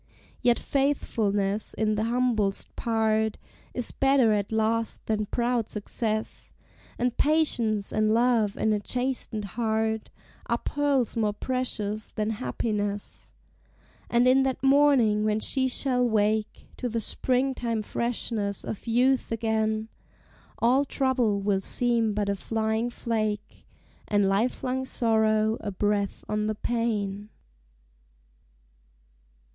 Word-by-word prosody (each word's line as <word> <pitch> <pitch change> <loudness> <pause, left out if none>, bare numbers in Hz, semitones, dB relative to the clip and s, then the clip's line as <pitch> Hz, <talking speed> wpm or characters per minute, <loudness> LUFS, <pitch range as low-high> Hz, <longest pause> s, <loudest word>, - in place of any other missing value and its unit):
Yet 240 -1 +4
faithfulness 215 -7 0
in 215 -1 +1
the 215 +1 0
humblest 230 -4 0
part 220 -1 +1 0.4
Is 245 - -1
better 270 -5 +3
at 205 0 -1
last 220 +1 0
than 215 -1 -1
proud 240 0 0
success, 215 +1 -3 0.4
And 245 0 0
patience 240 -9 +1
and 215 0 +2
love 230 -3 +2
in 220 - +2
a 210 - +1
chastened 245 -2 -2
heart 220 +1 -1 0.4
Are - - +1
pearls 285 -5 0
more 215 -2 +1
precious 215 -3 -2
than 215 +1 -1
happiness; 205 - -3 0.8
And 240 +1 +3
in 260 +1 +5
that 265 -1 -1
morning 270 -6 +4
when 215 0 +1
she 260 +4 +1
shall 250 -1 +1
wake 215 0 0
To 250 - -2
the 230 0 -1
spring 255 +4 +1
time 230 -3 -2
freshness 220 -3 -2
of 220 - -6
youth 250 +3 +2
again, 220 -1 0 0.7
All 245 +5 +3
trouble 255 -7 +1
will 195 -1 +1
seem 230 0 0
but 210 -1 0
a 200 - +1
flying 220 +3 -1
flake, 215 -3 -3 0.4
And 205 -1 +2
lifelong 250 +6 0
sorrow 220 -3 +2
a 210 - -3
breath 205 0 -1
on 210 0 -1
the 215 - -1
pane. 210 -3 -2
220 Hz, 120 wpm, -27 LUFS, 210-245 Hz, 0.8 s, in